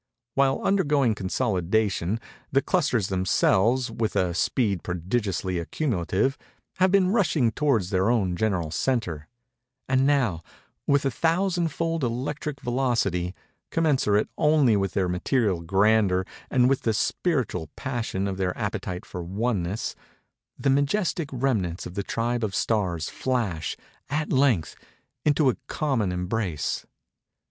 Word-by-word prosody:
While 135 -1 +2
undergoing 145 - +2
consolidation, 100 -1 0 0.3
the 135 0 +3
clusters 145 - +1
themselves, 100 +6 +2
with 110 -1 -2
a 90 -3 +1
speed 100 - 0
prodigiously 95 0 -2
accumulative, 105 - -1 0.4
have 185 0 +4
been 190 -1 +4
rushing 155 - +2
towards 115 -12 +1
their 95 +2 +2
own 100 -7 +1
general 90 -5 0
centre—and 125 - -2
now, 125 - +2 0.5
with 140 0 +3
a 135 - +2
thousand 170 +5 +1
fold 165 0 -2
electric 140 +4 -3
velocity, 115 -8 0 0.3
commensurate 135 -10 +2
only 150 -7 +4
with 95 -1 0
their 95 -2 +1
material 95 +1 0
grandeur 95 +1 +3 0.2
and 125 -2 +4
with 135 0 +2
the 110 -2 0
spiritual 120 - -1
passion 115 -7 -2
of 95 -1 -3
their 90 -2 -1
appetite 100 -4 -3
for 90 - -6
oneness, 100 +2 -2 0.6
the 135 - +1
majestic 145 +3 +1
remnants 115 -10 -1
of 90 - -7
the 100 - -2
tribe 120 +3 -1
of 100 -3 -2
Stars 90 -8 0
flash, 105 -12 -2 0.3
at 150 +2 -1
length, 130 - +2 0.5
into 150 -1 +3
a 130 - +2
common 130 - 0
embrace. 90 -4 -2
115 Hz, 125 wpm, -25 LUFS, 95-135 Hz, 0.6 s, have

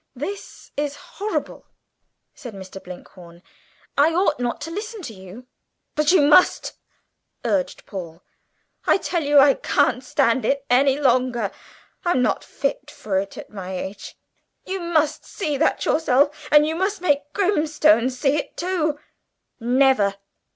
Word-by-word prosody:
"This 380 +10 -7
is 290 0 -2
horrible!" 415 +7 -5 0.7
said 240 -5 -10
Mr. 190 0 -10
Blinkhorn 175 -1 -12 0.5
"I 310 +3 +3
ought 365 -7 +2
not 245 -1 -2
to 325 +3 -5
listen 425 +2 -6
to 235 - -7
you." 190 +5 -12 0.5
"But 300 +1 +2
you 360 -5 +5
must," 295 +5 +4 0.7
urged 280 -2 -1
Paul; 175 -4 -8 0.6
"I - - +5
tell 355 -3 -2
you 290 0 +3
I 275 0 +7
can't 255 0 +1
stand 260 -3 +1
it 280 0 0
any 270 +2 +4
longer. 250 -6 +1 0.5
I'm 345 -8 +2
not - - 0
fit - - -3
for 195 -3 -2
it 195 0 -6
at - - -10
my 190 -2 -6
age. 190 +2 -7 0.5
You 385 +1 -3
must 315 -3 0
see 310 -7 -3
that 315 - +1
yourself, 295 0 +1
and 300 0 +7
you 315 +1 -2
must 385 +3 -1
make 290 -4 0
Grimstone 310 - +3
see 270 +3 0
it 295 - -5
too!" 335 -4 -1 0.6
"Never!" 245 -4 +3
285 Hz, 145 wpm, -22 LUFS, 240-315 Hz, 0.7 s, I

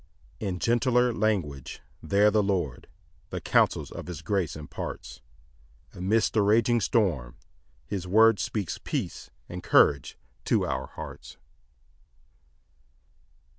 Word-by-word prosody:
6 105 - -3
In 90 - -3
gentler 120 +3 +2
language 90 - -2 0.2
there 105 +1 +3
the 105 0 +3
Lord 90 -11 -2 0.4
The - - -4
counsels - - +1
of - - -8
his 85 -3 -7
grace 90 -4 -1
imparts; 75 -1 -7 0.7
Amidst 100 +4 +1
the 110 - +3
raging 115 +3 +3
storm 80 - 0 0.5
his 95 -3 -4
word 110 +2 +5
Speaks 100 -6 -3
peace - - -4 0.2
and 90 +1 -7
courage 70 -6 +3 0.3
to - - +2
our 65 - -3
hearts. - - -10
100 Hz, 115 wpm, -27 LUFS, 85-110 Hz, 0.7 s, word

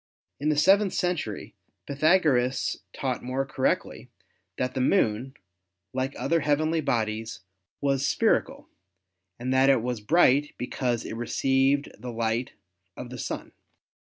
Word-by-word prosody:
In 150 +2 0
the 150 - +1
seventh 195 +5 +4
century 175 - -2 0.3
Pythagoras 140 -4 +2
taught 130 -2 -3
more 130 +2 -2
correctly - - -2 0.5
that 125 0 -1
the 130 - -1
Moon, 130 - +1 0.6
like 130 +1 -2
other 165 - +1
heavenly 155 +2 +1
bodies, 110 -3 -2 0.4
was 140 0 +1
spherical, - - +1 0.7
and 125 +2 -2
that 130 +1 +4
it 130 -4 +3
was 120 -3 -3
bright 145 +2 +3
because 125 -1 -2
it - - -5
received 135 +4 +1
the 125 - -6
light 115 +1 -2 0.4
of 125 -1 -8
the 125 - -7
Sun. - - -5
130 Hz, 130 wpm, -26 LUFS, 120-145 Hz, 0.7 s, seventh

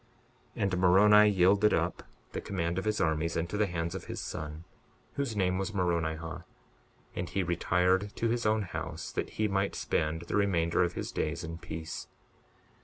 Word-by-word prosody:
62:43 - - 0
And 95 -2 +1
Moroni 105 +4 +7
yielded 100 +2 +4
up - - -1 0.3
the - - -4
command 85 -2 -2
of 95 - -5
his 105 0 0
armies 80 +1 0
into 85 +4 -2
the 105 0 +2
hands 85 -2 -3
of - - -6
his - - -5
son, 75 +1 -6 0.5
whose 140 -6 -2
name 95 -2 +1
was 100 +2 -3
Moronihah; 85 -2 -1 0.7
and 90 -1 -3
he 95 0 0
retired 90 +3 +1
to 115 - 0
his 120 +1 0
own 110 0 +2
house 90 - -5
that - - -3
he 110 - +2
might 100 0 0
spend 80 +2 -1
the - - -4
remainder 90 -5 +2
of 85 0 -1
his - - -4
days 80 +3 -2
in 85 0 -6
peace. 80 -1 -6
90 Hz, 180 wpm, -30 LUFS, 85-100 Hz, 0.7 s, Moroni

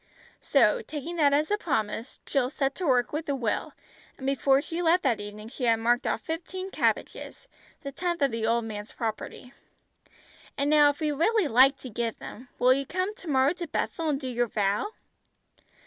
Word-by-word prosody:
So - - +3
taking 330 -3 -6
that 290 -3 +4
as 300 +5 +1
a 415 - +1
promise 225 - -3
Jill 255 -3 0
set 275 -1 -1
to 360 +1 -3
work 250 -1 +2
with 305 0 -3
a 280 - +1
will, 235 -5 -2 0.4
and 265 - -8
before 275 0 +3
she 330 +4 -4
left 350 +1 +3
that 250 -6 +1
evening 205 +1 -8
she 250 +1 -4
had 230 -1 +5
marked 240 +3 +1
off - - -1
fifteen 370 +4 -5
cabbages, - - -2 0.3
the 280 -3 -6
tenth 345 +1 -2
of 275 - +3
the 225 -1 -1
old 230 0 +1
man's 210 -1 -7
property. 230 +2 -5 1.0
"And 280 +1 +1
now 295 -1 +6
if 285 +2 -4
you 300 -1 0
really 395 +4 +2
like 265 +3 +5
to 255 - -7
give 230 +1 -2
them, 245 +3 -10
will 250 +1 +5
you 275 0 -2
come 370 +5 -2
to 430 -5 -13
morrow 270 +1 +3
to 345 -1 -6
'Bethel' 320 +2 -2
and 280 -2 0
do 265 - -5
your 240 -1 0
vow?" 205 - 0
275 Hz, 195 wpm, -27 LUFS, 240-320 Hz, 1.0 s, now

